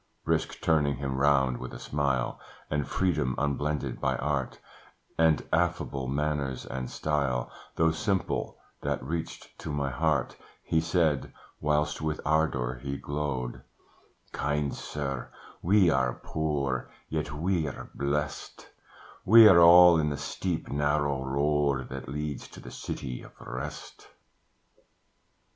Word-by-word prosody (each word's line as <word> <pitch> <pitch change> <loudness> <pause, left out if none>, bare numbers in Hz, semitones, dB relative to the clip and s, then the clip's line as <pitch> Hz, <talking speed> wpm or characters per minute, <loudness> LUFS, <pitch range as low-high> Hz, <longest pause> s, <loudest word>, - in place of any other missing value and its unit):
Brisk - - 0
turning 75 -4 +2
him 65 0 -3
round 65 -3 +3
with 65 - -7
a - - -8
smile, 70 -4 -1 0.3
And 75 -1 0
freedom 75 -9 0
unblended 75 +1 -1
by - - +1
art, 70 -2 -2 0.6
And 80 -2 +3
affable 80 -5 0
manners 70 -1 -1
and 65 0 -5
style, 70 -5 -1 0.2
Though 80 0 +3
simple, 95 +3 -1 0.2
that - - -2
reached 80 +4 -5
to 80 - -5
my 70 -2 -1
heart, 70 -1 0 0.3
He 80 - +1
said 80 -7 +1 0.3
(whilst 75 0 0
with 75 0 -2
ardour 70 -5 +1
he 70 0 -3
glowed), 70 -5 -3 0.7
"Kind 70 0 -1
sir, 70 -4 -4 0.3
we 95 -1 +4
are 65 -2 +1
poor, 70 -5 -2 0.2
yet 75 -2 -3
we're 80 -1 -2
blest: 75 +2 -3 0.5
We're 105 -4 +9
all 85 0 +9
in 75 -1 +1
the 70 - -3
steep, 80 +4 -3
narrow 75 -1 +1
road 70 0 +1
That 65 -1 -7
leads 75 0 -4
to - - -13
the - - -10
city 65 -3 -5
of - - -15
rest. 65 +5 -7
75 Hz, 125 wpm, -28 LUFS, 65-80 Hz, 0.7 s, We're